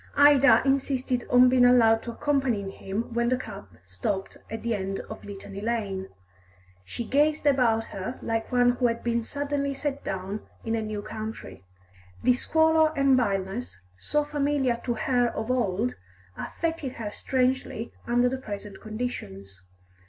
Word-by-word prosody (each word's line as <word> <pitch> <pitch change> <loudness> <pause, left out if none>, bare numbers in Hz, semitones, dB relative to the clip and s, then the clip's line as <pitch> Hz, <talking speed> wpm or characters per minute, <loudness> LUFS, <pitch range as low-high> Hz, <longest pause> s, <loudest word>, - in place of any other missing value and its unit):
Ida 280 -5 +7
insisted 265 -2 0
on 250 0 +7
being 250 0 +4
allowed 230 -3 +6
to 235 - -6
accompanying 245 -7 0
him 205 +5 -5
when 235 0 +1
the 255 - +2
cab 215 - -8 0.2
stopped 95 - -3
at 225 - -6
the 235 0 0
end 195 -1 -3
of 220 - -10
Litany 200 0 -8
Lane. 205 -4 -2 0.7
She 230 - -5
gazed 295 +5 +2
about 245 -6 +3
her 195 +5 -6
like 225 0 -2
one 245 -1 +4
who 245 0 +1
had 230 0 -2
been 235 0 +1
suddenly 280 +2 -2
set 285 0 -3
down 195 +2 -4 0.2
in 225 - -1
a 225 - 0
new 215 -1 -4
country; 215 - -7 0.6
this 250 +1 +3
squalor 320 0 +4
and 275 -1 +5
vileness, 195 - -1 0.2
so 295 - 0
familiar 285 -4 0
to 240 - 0
her 245 +2 +2
of 220 +3 -2
old, 230 -1 0 0.4
affected 325 - -3
her 215 -3 -5
strangely 255 -3 -1
under 245 +1 +3
the 260 +1 -1
present 205 -4 -7
conditions. 100 - -6
235 Hz, 150 wpm, -27 LUFS, 210-265 Hz, 0.7 s, Ida